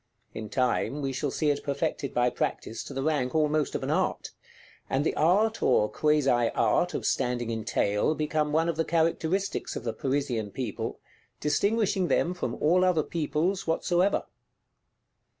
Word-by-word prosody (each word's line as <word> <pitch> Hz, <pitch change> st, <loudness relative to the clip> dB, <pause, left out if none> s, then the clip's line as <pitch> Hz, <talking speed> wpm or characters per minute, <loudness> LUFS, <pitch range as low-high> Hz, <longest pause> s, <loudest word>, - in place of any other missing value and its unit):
In 110 Hz, -1 st, -6 dB
time, 130 Hz, +4 st, 0 dB
we 135 Hz, -1 st, -1 dB
shall 140 Hz, +2 st, -1 dB
see 150 Hz, +2 st, +1 dB
it 145 Hz, -, -3 dB
perfected 140 Hz, -1 st, -2 dB
by 125 Hz, 0 st, +2 dB
practice 115 Hz, -1 st, -3 dB
to -, -, -8 dB
the 135 Hz, -, -2 dB
rank 145 Hz, -3 st, 0 dB
almost 155 Hz, -1 st, +1 dB
of -, -, -2 dB
an -, -, -1 dB
art; -, -, -1 dB, 0.6 s
and 135 Hz, +3 st, 0 dB
the -, -, +1 dB
art, 205 Hz, +8 st, +2 dB
or 105 Hz, -4 st, +3 dB
quasi 150 Hz, -2 st, +1 dB, 0.3 s
art, 180 Hz, -, +2 dB
of -, -, -3 dB
standing 120 Hz, -2 st, 0 dB
in 110 Hz, -1 st, -3 dB
tail 105 Hz, +6 st, +1 dB
become 150 Hz, 0 st, 0 dB
one 160 Hz, +2 st, +2 dB
of 170 Hz, -2 st, -1 dB
the 165 Hz, -, +2 dB
characteristics 170 Hz, +4 st, 0 dB
of -, -, -5 dB
the 115 Hz, -, -2 dB
Parisian 125 Hz, -4 st, -1 dB
People, 115 Hz, -1 st, -4 dB, 0.4 s
distinguishing 200 Hz, +5 st, +1 dB
them 175 Hz, -, +1 dB
from 180 Hz, -, -3 dB
all 175 Hz, +4 st, +3 dB
other 180 Hz, -4 st, +3 dB
Peoples 170 Hz, +5 st, -1 dB
whatsoever. 175 Hz, +4 st, +1 dB
150 Hz, 165 wpm, -27 LUFS, 130-170 Hz, 0.6 s, or